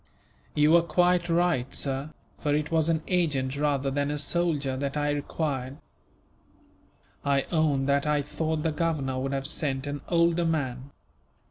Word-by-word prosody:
"You 150 +1 +4
were 170 +1 +7
quite 175 +1 +2
right, 165 -7 +1
sir, 135 +1 -2 0.3
for 145 -1 +1
it 150 +1 -2
was 160 0 +2
an 160 -1 +1
agent 145 -8 0
rather 140 -2 0
than 140 +1 0
a 150 - -2
soldier 145 -3 0
that 140 +2 -3
I 145 0 +1
required. 140 -2 -3 1.5
I 140 -1 +2
own 155 -5 +2
that 140 +1 +1
I 150 -1 +2
thought 155 +1 -2
the 160 - +1
Governor 150 -5 -1
would 135 +1 -2
have 135 0 -2
sent 135 -2 -1
an 145 0 -4
older 170 0 +3
man." 140 -5 -2
145 Hz, 155 wpm, -27 LUFS, 135-165 Hz, 1.5 s, were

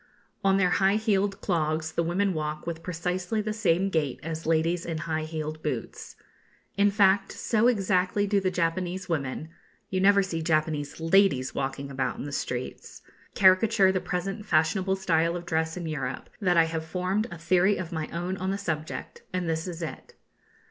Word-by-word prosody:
On 195 0 +4
their 185 -2 +3
high 195 +1 +4
heeled 205 -3 +1
clogs 160 -3 0
the 170 - 0
women 185 +4 +1
walk 155 -1 -3
with 165 -1 -4
precisely 180 +4 -2
the 215 0 -2
same 195 -2 +1
gait 150 -6 0
as 160 0 -5
ladies 165 +2 +1
in 165 -2 -3
high 155 0 -2
heeled 155 -1 -5
boots. 130 -8 -5 0.6
In 200 +1 +4
fact, 195 -1 +3
so 225 +1 +2
exactly 195 -3 +2
do 200 0 +2
the 190 -1 0
Japanese 180 +1 -1
women 150 -1 -3 0.4
(you 185 -1 0
never 200 0 +5
see 165 -4 -3
Japanese 155 -2 0
ladies 165 -6 +3
walking 135 +1 -3
about 135 0 -2
in - - -5
the 145 - -6
streets) 125 -2 -5 0.3
caricature 190 +1 +5
the 185 -1 -1
present 195 +4 -3
fashionable 190 +2 +2
style 170 -3 +1
of 175 0 -5
dress 160 0 -1
in 175 - -4
Europe, 140 -5 -4
that 180 -4 +2
I 165 - +7
have 160 0 -3
formed 185 +6 -1
a 170 - -8
theory 180 +4 +3
of 180 -3 -5
my 160 -2 -3
own 175 +3 -3
on 185 +1 -2
the 195 - -1
subject, 160 -6 -4
and 180 -2 -2
this 160 +1 -1
is 170 -1 -5
it. 160 - -7
175 Hz, 180 wpm, -27 LUFS, 160-195 Hz, 0.6 s, I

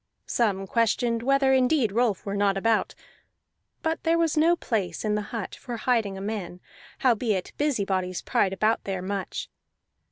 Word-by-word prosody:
Some 200 -5 0
questioned 230 +2 +1
whether 270 +1 +3
indeed 255 -3 +3
Rolf 225 -3 +1
were 200 0 -3
not 200 -1 +2
about; 225 +2 +1 0.9
but 320 0 -1
there 330 0 +2
was 330 -2 +1
no 325 +3 +4
place 205 - -2
in 210 - +1
the 210 - 0
hut 225 -4 -5
for 240 -3 -6
hiding 225 -5 0
a - - -6
man, 200 -4 -4 0.5
howbeit 220 -6 +1
busybodies 195 - 0
pried 190 - +1
about 215 +3 +1
there 190 -2 -3
much. 195 0 -4
220 Hz, 155 wpm, -26 LUFS, 195-250 Hz, 0.9 s, no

